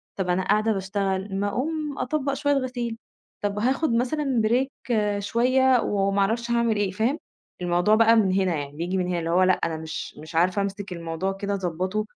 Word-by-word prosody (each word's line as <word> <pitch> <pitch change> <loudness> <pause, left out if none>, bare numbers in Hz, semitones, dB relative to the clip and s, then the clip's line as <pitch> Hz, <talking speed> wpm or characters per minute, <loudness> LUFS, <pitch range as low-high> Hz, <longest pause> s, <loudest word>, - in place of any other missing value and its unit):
طَب 190 -2 -2
أنا 180 +1 +1
قاعدة 215 +3 +2
باشتغل، 195 0 -2
ما 205 - 0
أقوم 295 +6 -2
أطبّق 280 0 -1
شوية 285 +1 +1
غسيل، 245 -4 -2 0.4
طَب 205 0 -1
هاخد 265 +3 +1
مثلًا 255 0 +1
break 255 +4 +2 0.5
شوية، 255 +4 +3
وما 200 0 0
أعرفش 235 +4 0
هاعمل 235 -2 +2
إيه، 205 -2 0
فاهم؟ 230 +10 0 0.4
الموضوع 175 +4 +3
بقى 230 +1 +5
من 200 -4 +3
هنا 185 -3 +1
يعني، 145 -1 -4
بييجي 180 +3 -2
من 180 -1 0
هنا. 175 -1 -1
اللي 165 0 -3
هو 180 +2 +4
لأ، 185 0 +5
أنا 160 -2 -2
مش 160 0 -6
مش 160 +2 -10
عارفة 185 +4 +2
أمسك 200 -1 -4
الموضوع 170 +3 -3
كده، 200 +1 -3
أضبطه، 185 +3 -2
205 Hz, 185 wpm, -25 LUFS, 185-240 Hz, 0.5 s, بقى